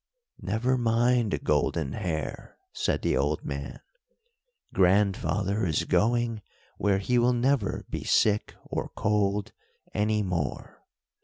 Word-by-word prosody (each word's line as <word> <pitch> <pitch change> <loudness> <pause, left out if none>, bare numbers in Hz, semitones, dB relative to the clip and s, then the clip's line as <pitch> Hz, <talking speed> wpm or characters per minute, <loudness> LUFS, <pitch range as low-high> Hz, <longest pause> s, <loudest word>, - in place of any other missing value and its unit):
"Never 125 +6 0
mind, 120 -1 +2
Golden 75 -6 0
Hair," 80 -8 -4 0.2
said - - -1
the - - +2
old 75 +2 0
man, 70 0 -5 0.9
"grandfather 100 +2 +2
is 85 -2 +1
going 115 +5 +1 0.4
where 100 -1 +2
he 120 +5 +1
will 120 +1 +3
never 120 -3 0
be - - -5
sick 105 -1 +2
or - - -4
cold 105 -1 0 0.4
any 105 0 +1
more. 85 -8 -3
105 Hz, 110 wpm, -27 LUFS, 90-115 Hz, 0.9 s, will